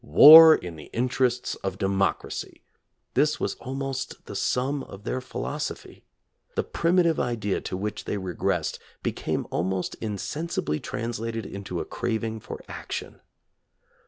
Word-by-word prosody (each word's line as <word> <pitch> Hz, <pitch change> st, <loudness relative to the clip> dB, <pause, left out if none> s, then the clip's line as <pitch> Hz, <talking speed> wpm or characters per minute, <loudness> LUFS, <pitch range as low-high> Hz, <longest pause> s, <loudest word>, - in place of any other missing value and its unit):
War 155 Hz, -, +10 dB
in 85 Hz, -2 st, -7 dB
the 75 Hz, -, -11 dB
interests 125 Hz, 0 st, 0 dB
of 95 Hz, -1 st, -3 dB
democracy! 95 Hz, 0 st, -1 dB, 0.5 s
This -, -, +2 dB
was -, -, -1 dB
almost 135 Hz, 0 st, -4 dB
the 100 Hz, -, -8 dB
sum 130 Hz, +7 st, 0 dB
of 100 Hz, +1 st, -11 dB
their 130 Hz, +3 st, -2 dB
philosophy. 130 Hz, -, -5 dB, 0.5 s
The -, -, +1 dB
primitive 170 Hz, -1 st, +2 dB
idea 115 Hz, -5 st, -1 dB
to 95 Hz, -, -4 dB
which 105 Hz, +2 st, -4 dB
they -, -, -2 dB
regressed 95 Hz, -3 st, -2 dB, 0.2 s
became -, -, -2 dB
almost 95 Hz, +1 st, -1 dB
insensibly 110 Hz, -, -3 dB
translated 115 Hz, -1 st, -4 dB
into 95 Hz, -3 st, -5 dB
a -, -, -3 dB
craving 110 Hz, -1 st, -3 dB
for 110 Hz, -, -8 dB
action. -, -, -6 dB
115 Hz, 130 wpm, -26 LUFS, 95-135 Hz, 0.5 s, War